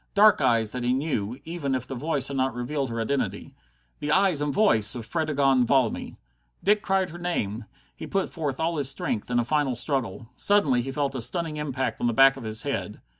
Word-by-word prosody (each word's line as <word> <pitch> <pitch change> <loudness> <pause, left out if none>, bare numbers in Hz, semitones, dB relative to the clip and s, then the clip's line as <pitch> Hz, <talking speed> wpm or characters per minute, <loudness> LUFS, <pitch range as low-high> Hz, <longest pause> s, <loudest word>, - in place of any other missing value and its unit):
Dark 205 -4 +6
eyes 115 -4 +2
that 125 -1 -4
he 125 +1 +2
knew, 130 -4 -2
even 160 -5 -2
if 125 -1 -3
the 135 - -7
voice 140 0 0
had 140 - -4
not 130 -2 0
revealed 135 +2 -2
her 115 0 -4
identity. 135 +5 -2 0.5
The 150 - -2
eyes 190 -4 +3
and 145 0 0
voice 125 - +3
of 120 -3 -6
Fredegonde 140 -5 +1
Valmy! 130 -4 0 0.5
Dick 210 +1 +3
cried 190 -4 0
her 175 - -9
name. 115 - -2 0.3
He - - -8
put 195 -1 0
forth 145 -6 -4
all 165 0 0
his 140 -2 0
strength 115 -5 -3
in 120 - 0
a 120 - +2
final 145 -2 0
struggle. 120 -4 -2
Suddenly 150 -12 +2
he 135 +3 -5
felt 140 0 -1
a 130 - -3
stunning 160 +4 -2
impact 135 -3 -3
on 120 - +2
the 120 - +1
back 135 +3 +6
of 135 - -9
the 110 -1 -2
head. 120 -6 -3
135 Hz, 215 wpm, -26 LUFS, 120-155 Hz, 0.5 s, Dark